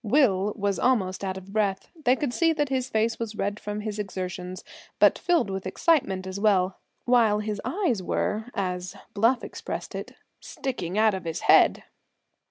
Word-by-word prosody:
Will 210 -5 +3
was 200 -3 0
almost 195 -7 +1
out 190 -1 -2
of 190 +1 -11
breath. 200 -3 0 0.2
They 250 +1 +5
could 265 -2 -2
see 330 +3 +3
that 295 -3 0
his 260 -1 -1
face 225 0 0
was 225 -2 -4
red 205 0 -2
from 210 0 -4
his 210 -1 -4
exertions, 185 -2 -5 0.3
but - - +5
filled 340 - +1
with 190 -1 -4
excitement 195 - +1
as 190 +1 -5
well; 190 -3 +2 0.3
while 235 -4 +4
his 210 -1 -3
eyes 335 - 0
were, 210 +4 -1
as 180 -2 -3 0.2
Bluff 230 +5 +2
expressed - - -6
it, - - -7 0.2
"sticking 200 -9 -4
out 215 -1 +4
of 190 -2 -5
his 165 -1 -3
head!" - - +5
210 Hz, 175 wpm, -26 LUFS, 190-240 Hz, 0.3 s, They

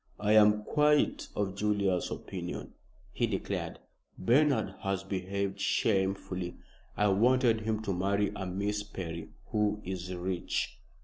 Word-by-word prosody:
"I 105 0 +1
am 105 0 +6
quite 150 +3 +2
of 100 -2 -1
Julius's 100 -3 +1
opinion," - - -6 0.4
he - - 0
declared. - - -3 0.4
"Bernard 140 +8 +3
has 95 -2 -1
behaved 95 +1 -2
shamefully. 95 -3 0 0.4
I 105 0 +3
wanted 115 +2 +4
him 110 0 -1
to 100 -3 -1
marry 100 +3 +1
a 95 - -4
Miss 100 +3 -1
Perry, 85 -5 -6 0.2
who 105 -1 +1
is 90 0 -4
rich." 90 0 -2
100 Hz, 125 wpm, -31 LUFS, 95-105 Hz, 0.4 s, am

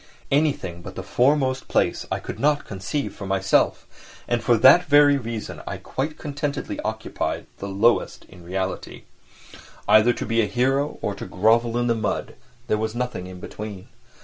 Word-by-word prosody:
Anything 135 - 0
but - - -9
the - - -5
foremost 130 0 +1
place - - 0
I - - +1
could - - -7
not 145 0 +2
conceive 100 +9 -4
for 100 - -7
myself, 95 0 +2 0.4
and 120 -1 0
for 120 -2 +4
that 135 +10 +7
very 145 0 +6
reason 115 -3 -6
I - - -4
quite 150 +4 -4
contentedly 145 -1 -4
occupied - - -3
the 100 - -5
lowest 105 +5 +1
in 90 - -15
reality. 95 +2 -4 0.8
Either 110 +3 +6
to - - -4
be 115 0 +2
a 105 - 0
hero 135 +6 0
or 105 - -1
to - - -7
grovel 115 +4 +2
in 120 - +1
the 120 - +3
mud—there 110 -1 -4
was 110 +1 -2
nothing 95 -7 -4
between. 100 -1 -8
115 Hz, 160 wpm, -23 LUFS, 100-140 Hz, 0.8 s, that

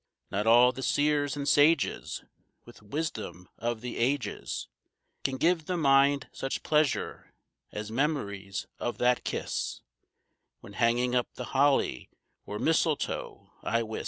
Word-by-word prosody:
Not 105 +3 -1
all 120 +2 +7
the 130 - -8
seers 145 0 +1
and 140 -1 -3
sages 145 0 +3 0.4
With - - -15
wisdom 105 - -5
of 115 -1 -2
the 125 -1 -5
ages 120 -3 -1 0.6
Can 135 -1 -1
give 165 +2 +2
the 180 - -1
mind 140 -2 +4
such 135 - -4
pleasure 150 -2 0 0.4
as 105 +1 -5
memories 100 -8 -2
of 120 - -2
that 125 0 +2
kiss - - -3 0.8
When - - -12
hanging 120 +2 +2
up 125 -1 +2
the 125 - -7
holly 135 - +2 0.4
or 105 - -4
mistletoe, 160 +2 -1
I 115 0 0
wis. 110 -1 -5
130 Hz, 130 wpm, -29 LUFS, 115-145 Hz, 0.8 s, all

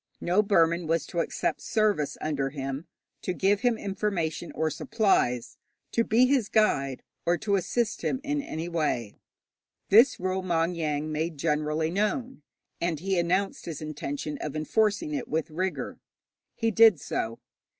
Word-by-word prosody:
No 180 +4 +3
Burman 170 -4 +2
was 165 0 +1
to 170 - -4
accept - - -1
service 210 -9 +1
under 140 -3 -1
him, 135 +2 -5 0.3
to 185 - -2
give 195 +3 +2
him 240 -1 +2
information 190 -5 -2
or 155 0 0
supplies, 190 - +1 0.3
to 230 - +2
be 230 +3 +4
his 255 -5 +2
guide, 140 - +2 0.2
or 175 +1 +2
to 200 +1 0
assist 215 +5 -1
him 260 - -1
in 290 -1 -1
any 165 - -5
way. 150 -10 -1 0.8
This 235 +6 +6
rule 185 +1 -1
Maung 170 -1 +1
Yaing 155 -2 -1
made 155 +1 -2
generally 155 +1 0
known, 215 - -1 0.4
and 170 -3 0
he 190 +1 0
announced 185 +3 0
his 165 -4 -5
intention 150 -1 -4
of 150 -1 -5
enforcing 215 - +1
it 275 -4 -3
with 160 0 -2
rigour. 185 +4 -3 0.6
He 225 0 0
did 220 -5 +6
so. 115 -3 -3
175 Hz, 150 wpm, -27 LUFS, 155-210 Hz, 0.8 s, This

